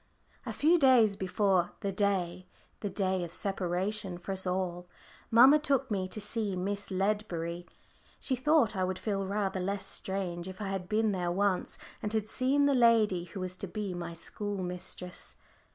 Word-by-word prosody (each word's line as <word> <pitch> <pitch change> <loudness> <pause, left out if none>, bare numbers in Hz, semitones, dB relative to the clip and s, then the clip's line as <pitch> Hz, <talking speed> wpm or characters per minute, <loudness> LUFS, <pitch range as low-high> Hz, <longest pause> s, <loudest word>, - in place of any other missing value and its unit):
A - - -2
few 335 +4 +3
days 245 -7 +5
before 190 -1 +1
the 200 -2 -1
day 185 -2 0 0.3
the 205 - -3
day 190 -1 0
of 170 - -6
separation 190 0 -1
for 180 +2 -6
us 190 -1 +1
all 180 -1 -2 0.4
mamma 260 +6 +7
took 275 -4 0
me 190 -2 0
to 215 - -4
see 210 -1 -1
Miss 200 +2 -3
Ledbury. 185 -4 -2 0.5
She 260 - 0
thought 270 -4 +3
I 185 - 0
would 185 0 -1
feel 195 -2 -2
rather 195 -1 -1
less 195 +1 -2
strange 185 -3 -2
if 185 +1 -8
I 205 -2 -3
had 190 -2 -4
been 215 0 +2
there 180 -3 -1
once, 195 0 0 0.2
and 210 - -3
had 220 -2 0
seen 265 +5 +1
the 285 - +4
lady 225 -8 +4
who 185 +2 -7
was 185 0 -4
to 195 - -4
be 200 0 -4
my 170 -1 -5
school 200 +3 -4
mistress. 180 0 -5
195 Hz, 175 wpm, -30 LUFS, 180-215 Hz, 0.5 s, mamma